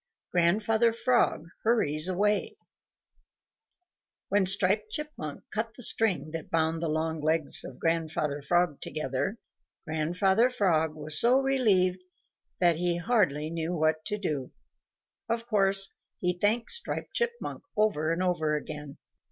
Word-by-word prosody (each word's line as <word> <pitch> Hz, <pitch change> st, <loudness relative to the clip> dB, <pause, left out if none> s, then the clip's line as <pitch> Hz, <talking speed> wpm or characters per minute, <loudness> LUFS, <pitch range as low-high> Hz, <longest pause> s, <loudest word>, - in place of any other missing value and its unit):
XVIII -, -, -62 dB
GRANDFATHER 220 Hz, +6 st, +3 dB
FROG 235 Hz, -8 st, +1 dB
HURRIES 170 Hz, -9 st, +2 dB
AWAY 205 Hz, -, 0 dB, 1.7 s
When 200 Hz, -2 st, +2 dB
Striped 200 Hz, +3 st, +2 dB
Chipmunk 255 Hz, -, -6 dB
cut 220 Hz, +1 st, -2 dB
the 245 Hz, -, 0 dB
string 205 Hz, -9 st, +1 dB
that 165 Hz, -1 st, -6 dB
bound 160 Hz, 0 st, 0 dB
the 170 Hz, -, -1 dB
long 160 Hz, 0 st, -1 dB
legs 155 Hz, -1 st, +2 dB
of 130 Hz, -, -9 dB
Grandfather 155 Hz, -3 st, -1 dB
Frog 175 Hz, 0 st, +1 dB
together, 155 Hz, -, -3 dB, 0.5 s
Grandfather 180 Hz, +9 st, +2 dB
Frog 160 Hz, -10 st, +1 dB
was 155 Hz, 0 st, -1 dB
so 245 Hz, +3 st, +5 dB
relieved 205 Hz, -10 st, +2 dB, 0.6 s
that 175 Hz, -3 st, +3 dB
he 175 Hz, 0 st, 0 dB
hardly 170 Hz, -, +1 dB
knew 165 Hz, +1 st, -2 dB
what 155 Hz, 0 st, +1 dB
to 210 Hz, -, -2 dB
do. 150 Hz, -10 st, -3 dB, 0.8 s
Of 230 Hz, 0 st, -1 dB
course 195 Hz, -3 st, +2 dB, 0.3 s
he 180 Hz, 0 st, +1 dB
thanked 210 Hz, +6 st, 0 dB
Striped 470 Hz, 0 st, -4 dB
Chipmunk 475 Hz, 0 st, -3 dB, 0.2 s
over 185 Hz, -8 st, +2 dB
and 170 Hz, +2 st, 0 dB
over 160 Hz, -4 st, +1 dB
again. 150 Hz, -1 st, -6 dB
180 Hz, 130 wpm, -28 LUFS, 155-215 Hz, 1.7 s, so